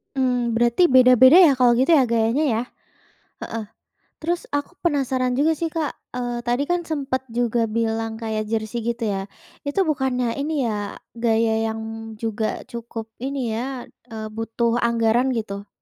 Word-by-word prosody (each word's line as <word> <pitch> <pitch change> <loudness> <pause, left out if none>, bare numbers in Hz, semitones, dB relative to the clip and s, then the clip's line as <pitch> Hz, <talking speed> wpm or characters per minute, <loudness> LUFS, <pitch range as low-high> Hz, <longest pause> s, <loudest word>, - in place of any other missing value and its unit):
Mmm, 250 -3 +1
berarti 240 +9 +3
beda-beda 260 +1 +7
ya 330 -6 +7
kalau 245 -1 +5
gitu 260 +6 +2
ya 265 - +4
gayanya 230 +4 +1
ya? 230 -4 +1 0.8
Heeh. 225 -2 -5 0.6
Terus 345 +2 -2
aku 285 0 -2
penasaran 260 -5 0
juga 295 +5 +3
sih 335 - 0
Kak, 320 -2 -2 0.2
eee, 245 -1 -2
tadi 245 +3 +1
kan 345 +2 -1
sempet 270 -4 -2
juga 235 -1 0
bilang 225 0 -1
kayak 220 -1 -3
jersey 220 +1 -2
gitu 235 0 -2
ya. 195 -2 -2 0.4
Itu 385 +7 +1
bukannya 260 -6 0
ini 295 -1 -1
ya, 210 -3 -3 0.2
gaya 230 -1 +1 0.2
yang 220 0 -4 0.4
juga 220 0 -3
cukup 230 -1 -7
ini 260 -2 -3
ya, 245 +3 -4 0.2
eee, 220 -2 -6
butuh 230 +1 -1
anggaran 235 +1 +2
gitu, 200 -2 -5
240 Hz, 150 wpm, -22 LUFS, 225-265 Hz, 0.8 s, beda-beda